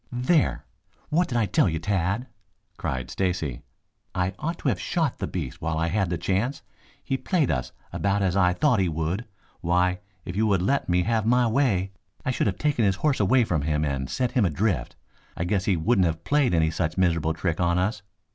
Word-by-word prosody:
"There! 130 +6 +1 0.4
What 165 +3 +2
did 120 - -1
I 115 - +3
tell 90 -1 +2
you, 80 - -2
Tad?" 100 +6 -1 0.5
cried 65 -1 -4
Stacy. 90 -9 -2 0.5
"I 90 +1 0
ought 165 +3 -2
to - - 0
have - - -1
shot 160 -6 -1
the - - -2
beast 75 -9 -5
while 80 -1 -1
I 80 +1 0
had 95 -1 0
the 85 - -1
chance. 100 - -1 0.4
He 135 - -1
played 165 -1 +1
us 65 -3 -2 0.2
about 100 0 +1
as 95 -1 +1
I 90 -2 +4
thought 125 +1 +2
he 95 -2 +2
would. 80 +8 -2 0.3
Why, 90 +1 +1 0.3
if 85 - -5
you 110 +1 +2
had 90 -2 +1
let 135 +3 0
me 90 0 +3
have 110 0 0
my 125 +1 +4
way, 110 -6 +1 0.3
I 130 - +1
should 125 - 0
have 95 - -1
taken 145 -6 +1
his 100 -2 +3
horse 145 -3 +2
away 120 +5 +4
from 85 -9 0
him 75 +1 0
and 70 -2 -2
set 125 -2 -1
him 125 - +2
adrift. 90 - 0 0.4
I - - -1
guess 95 +2 0
he 95 -4 +2
wouldn't 95 +2 +3
have 80 0 -3
played 140 -7 +2
any 80 -1 +2
such 80 0 -2
miserable 85 -3 +2
trick 85 -3 -2
on 85 0 +2
us. 105 +4 0
95 Hz, 210 wpm, -25 LUFS, 85-120 Hz, 0.5 s, I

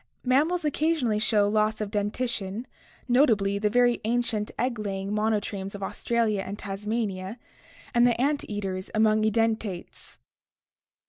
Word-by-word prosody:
Mammals 305 +8 +2
occa 305 +2 +1
sionally 225 -8 0
show 210 -2 +3
loss 215 +1 +1
of 210 -2 -3
dentition, 210 0 -2 0.4
notably 220 -6 +3
the 210 0 +1
very 245 +1 +3
ancient 225 -2 0
egg 245 -2 -1
laying 195 -1 -3
monotremes 210 -2 -1
of 200 - -6
Australia 225 -2 0
and 195 +1 -6
Tasmania 200 0 -3 0.6
and 240 0 +5
the 235 -1 +1
ant 285 +3 +1
eaters 190 -3 -4
among 215 0 +4
edentates. 220 -3 -1
215 Hz, 130 wpm, -27 LUFS, 205-240 Hz, 0.6 s, and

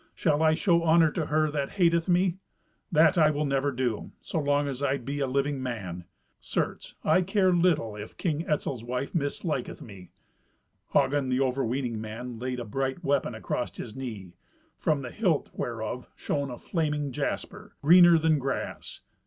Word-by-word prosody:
Shall 150 -2 +1
I 155 0 +4
show 170 0 +2
honour 165 -1 +5
to 160 -2 -2
her 155 0 +2
that 140 -2 -2
hateth 170 -2 +2
me? 180 +1 +2 0.5
That 165 +2 +5
I 155 -1 +6
will 150 0 0
never 140 0 +1
do, 125 -4 -2
so 160 - -3
long 145 0 +1
as 135 -1 -4
I 140 -1 +1
be 140 +3 -5
a 135 - 0
living 140 +1 0
man. 95 -9 -5 0.3
Certes, - - -3
I 185 - +4
care 190 0 +2
little 165 -11 +2
if 105 +1 -9
King 160 -1 -1
Etzel's 135 -5 -1
wife 125 +3 -3
misliketh 145 -3 -2
me." 95 -5 -11 0.8
Hagen, 140 -1 +2
the 130 +1 +1
overweening 125 -3 -1
man, 115 +2 -6
laid 125 0 -3
a 120 - -5
bright 135 - -2
weapon 140 -5 0
across 120 +2 -3
his 110 -3 -7
knee, 110 -9 -7 0.4
from 150 -3 0
the 125 - -6
hilt 180 -9 0
whereof 120 +1 -4
shone 140 -1 -2
a 125 - -6
flaming 150 -3 -2
jasper, - - -4
greener 175 +2 +8
than 160 -1 +2
grass. 135 0 -4
140 Hz, 170 wpm, -28 LUFS, 125-160 Hz, 0.8 s, greener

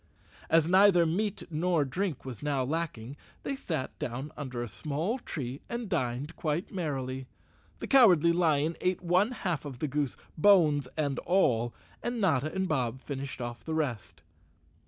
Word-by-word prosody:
As 165 -1 +4
neither 185 -1 +6
meat 200 +5 -1
nor 165 -1 +1
drink 175 +1 -3
was 125 -5 -6
now 145 -3 0
lacking, 140 -4 -3 0.3
they 275 - -2
sat 160 - -4
down 130 +5 -4
under 130 -5 -4
a - - -4
small 160 - -2
tree 135 - -5
and 235 -1 -3
dined 140 -4 -2
quite 155 +3 -2
merrily. 135 -7 -3 0.5
The - - -5
Cowardly 180 - +6
Lion 160 -2 +2
ate 185 0 0
one 180 +5 +3
half 185 - -2
the 145 0 -4
goose, 145 -2 -1 0.2
bones 155 -8 +5
and 145 -3 0
all, 120 -11 +2 0.3
and 240 0 -2
Notta 155 - +2
and 190 +2 -1
Bob 130 -5 -1
finished 140 -1 -5
off 120 0 -5
the 160 - -3
rest. 120 - -3
155 Hz, 155 wpm, -30 LUFS, 130-180 Hz, 0.5 s, neither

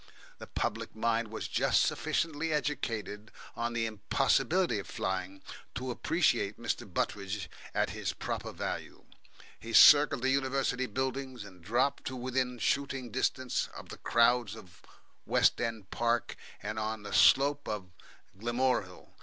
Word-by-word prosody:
The - - -9
public - - -3
mind 115 +1 0
was 110 - -5
just - - +2
sufficiently 165 0 -1
educated 115 -8 -3 0.2
in 120 0 -2
the 115 -1 0
impossibility 115 - +1
of 100 - -7
flying 95 +1 -3 0.3
to 125 +2 -3
appreciate 120 - +1
Mr. 115 -4 -3
Butteridge 100 0 -2 0.3
at - - +1
his - - -3
proper - - -4
value. - - -5 0.5
He 115 0 -8
circled 145 -4 +8
the 130 - +3
University 130 -1 0
buildings, 130 -2 -3
and 90 -3 -14
dropped 120 +9 0
to 130 - -4
within 125 0 -1
shouting 135 -1 -1
distance 130 0 -1
of - - -10
the - - -8
crowds 115 -2 +2
in 100 -6 -13 0.6
West - - +3
End 115 -5 -4
Park 120 0 0 0.3
and 110 +1 -3
on 110 0 -3
the 100 - -7
slope 145 +1 +5
of 100 -4 -4 0.5
Gilmorehill. 120 -4 -1
120 Hz, 135 wpm, -31 LUFS, 105-130 Hz, 0.6 s, circled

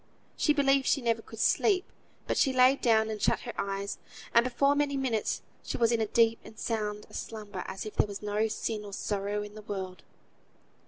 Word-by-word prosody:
She 300 - +2
believed 275 -2 +3
she - - +3
never 230 -3 0
could 225 - -12
sleep, 375 - +3 0.4
but - - -1
she 270 - +3
lay 255 +1 +6
down, 220 -4 +2
and 215 -1 -5
shut - - +2
her - - -6
eyes; 200 0 -3 0.3
and 235 - +6
before 255 +3 +2
many 285 -1 +1
minutes 240 -6 -1 0.2
she - - -4
was 230 -1 +3
in 230 -1 +2
as 220 - +1
deep 230 -1 +3
and 220 - -13
sound 210 -2 -2
a - - -19
slumber 210 -4 -6
as 190 +2 -5
if 215 - -7
there - - +3
was 200 0 -7
no 210 +1 +1
sin 220 0 -3
nor 205 -1 -9
sorrow 205 +1 -2
in 210 0 -9
the 215 - -9
world. 190 -3 -5
220 Hz, 210 wpm, -29 LUFS, 210-255 Hz, 0.4 s, lay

